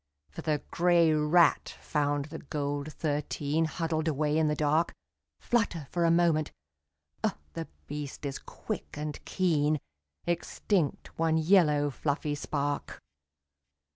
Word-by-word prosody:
For - - -7
the 155 -2 -1
grey 170 -2 +4
rat 155 +2 +3
found 145 -1 0
the 160 +2 -8
gold 145 0 -3
thirteen 150 +1 -1
Huddled 160 0 -1
away 150 0 +1
in 160 -1 +3
the 150 - +1
dark, 155 +3 +1 0.4
Flutter 205 -10 0
for 175 -1 +1
a - - +4
moment, 165 -2 +3 0.7
oh - - +1 0.2
the - - -5 0.2
beast 145 - -6
is 135 -1 -3
quick - - -6
and 150 0 -5
keen, 155 -5 +2 0.5
Extinct 175 -1 -1
one 160 -1 +3
yellow 155 -4 +4
fluffy 145 +2 -1
spark. 145 0 -2
155 Hz, 125 wpm, -29 LUFS, 145-165 Hz, 0.7 s, grey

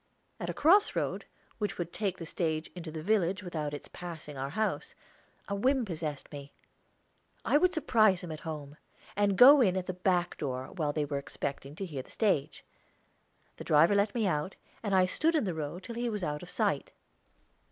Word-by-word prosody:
At - - -4
a - - -1
cross 390 +8 +5
road, - - -2 0.3
which 205 -2 -2
would 175 -1 -4
take 195 -4 -2
the 165 - -7
stage 160 -1 -2
into 175 -2 -7
the 155 0 -6
village 190 -1 +1
without 155 -5 -3
its 145 - -7
passing 160 -4 -8
our 135 +1 -3
house, 215 +6 -2 0.5
a 200 - -3
whim 255 +5 +2
possessed 155 -6 -5
me. 140 -1 -9 0.9
I 290 - +4
would 365 +1 +4
surprise 215 - +3
them 175 - -7
at 155 - -6
home, 150 -2 -7 0.4
and 200 -1 +2
go 275 +3 +9
in 190 -5 +3
at 185 - -2
the 185 - -3
back 180 -1 0
door, 130 0 -3
while 155 -6 -1
they 150 0 -1
were 140 -1 -2
expecting 140 0 -5
to 195 - -4
hear 145 -7 -5
the - - -18
stage. 195 -11 0 0.9
The - - -7
driver 160 +6 +5
let 200 +2 +2
me 225 -3 +1
out, 175 0 -1 0.3
and 205 -3 0
I 185 -1 +5
stood 315 - +1
in 310 - +2
the 185 -4 -1
road 160 +4 -5
till 235 - -7
he 240 +1 -2
was 210 -4 -3
out 150 -2 -2
of - - -9
sight. - - -1
180 Hz, 200 wpm, -30 LUFS, 150-205 Hz, 0.9 s, go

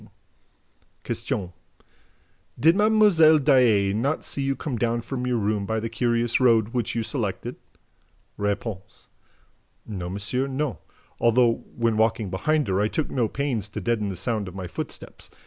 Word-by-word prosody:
"Did - - -4 1.5
Mlle. 205 -7 +5
Daae 125 -9 +4
not 135 +9 -1
see 140 - -4
you 135 0 0
come 135 -3 -4
down 120 0 0
from 125 +1 -4
your 125 -1 +1
room 105 -1 -1
by 110 0 0
the 115 +1 -4
curious 120 0 +1
road 115 -4 +4
which 120 -3 -2
you 115 - 0
selected?" - - -3 0.8
R. 100 0 +1 1.3
"No, 95 -5 -5
monsieur, 105 +8 -2
no, 135 -1 -2 0.4
although, 120 0 +3
when 115 -2 +1
walking 110 -3 +1
behind 150 +8 0
her, 95 +1 +1
I 105 - +2
took 155 +7 -2
no 120 -4 +1
pains 120 -4 -2
to - - -5
deaden 110 -4 -1
the 95 - -4
sound 105 +2 -2
of 90 - -9
my 95 -1 -5
footsteps. 85 - -7
115 Hz, 145 wpm, -25 LUFS, 105-135 Hz, 1.5 s, Mlle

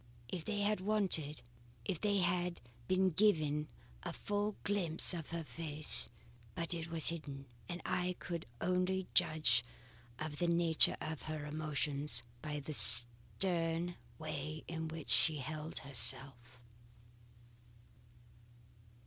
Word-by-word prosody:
If 175 -4 -6
they 210 -2 -2
had 210 -1 0
waited 185 -9 +1 0.4
if 165 +5 -3
I 205 -1 +1
had 175 0 -1 0.3
been 185 0 +2
given 155 -5 +1 0.3
a - - -5
full 205 0 -3
glimpse 185 -5 +1
of 165 -4 -6
her 170 0 -4
face 155 -1 -2 0.5
But 165 0 -4
it 165 -1 -5
was 165 -2 -1
hidden, 145 -5 -7 0.2
and 175 0 -6
I 180 0 -1
could 170 -2 -6
only 185 +1 -1
judge 155 -9 +3 0.5
of 155 0 -6
the 175 - 0
nature 170 -1 +2
of 155 -1 -6
her 155 -1 -5
emotions 150 -3 0 0.2
by 150 0 -5
the 155 +2 -7
stern 165 +9 +6 0.2
way 155 0 -6
in 160 -1 -5
which 160 -1 -7
she 155 -2 +3
held 155 +3 -6
herself. 125 -1 +2
160 Hz, 125 wpm, -35 LUFS, 150-180 Hz, 0.5 s, stern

